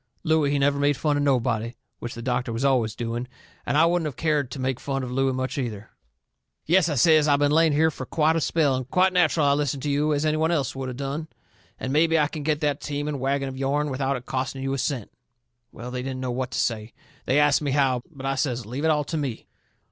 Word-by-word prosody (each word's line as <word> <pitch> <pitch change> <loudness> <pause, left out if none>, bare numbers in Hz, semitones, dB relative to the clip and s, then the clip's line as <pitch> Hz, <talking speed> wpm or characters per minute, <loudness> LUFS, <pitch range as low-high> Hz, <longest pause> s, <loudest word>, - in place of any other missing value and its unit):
Looey, 160 -3 +2
he 145 - +1
never 140 0 +2
made 145 -1 +2
fun 150 -2 +1
of 145 - 0
nobody, 120 -4 0 0.2
which 120 - -6
the 115 - -7
doctor 125 -1 -1
was 115 +4 -2
always 120 -5 +2
doing, 120 +1 -4 0.4
and 145 - +1
I 160 - +6
wouldn't 170 -1 +1
of 145 - -6
cared 150 -5 0
to - - -7
make 130 -1 -1
fun 135 -1 -3
of 125 - -5
Looey 135 +1 +1
much, 130 +2 -3
either. 110 -5 -5 0.7
"Yes," 175 0 +3
I 150 - -1
says, 155 +3 +5
"I 145 - +5
been 145 0 +2
laying 160 0 +4
here 160 +2 +3
fur 130 - -7
quite 160 +3 +2
a 165 - +1
spell, 150 -3 +2
and 130 0 -5
quite 185 +3 +3
natcheral 165 -4 +3
I 140 - +4
listened 140 -2 -1
to 145 - -1
you, 150 +2 +1
as 150 +1 0
any 155 0 +1
one 160 +1 +1
else 145 -8 0
would 135 -1 -4
of 125 - -7
done. 140 +3 -4 0.5
And 130 - -3
mebby 165 +2 +3
I 150 -2 +2
can 155 - -6
get 150 +1 -1
that 145 -1 0
team 145 0 -3
and 145 -2 -3
wagon 135 +1 0
of 130 0 -6
yourn 145 +2 0
without 135 +1 -1
it 125 - -11
costing 130 +1 -3
you 135 0 -1
a 135 - -2
cent." 125 -4 -2 0.6
Well, 125 +2 -8
they 125 0 -3
didn't 130 0 -4
know 130 -1 -3
what 125 +1 -2
to - - -5
say. 110 -1 -2 0.3
They 130 - +3
asts 145 0 +4
me 145 - -1
how, 135 -3 +2
but 140 -5 -10
I 135 - +1
says 130 -2 -1
to 105 - -13
leave 135 +6 -3
it - - +3
all 150 -1 +2
to 160 - -4
me. 135 -7 -4
140 Hz, 260 wpm, -25 LUFS, 130-150 Hz, 0.7 s, I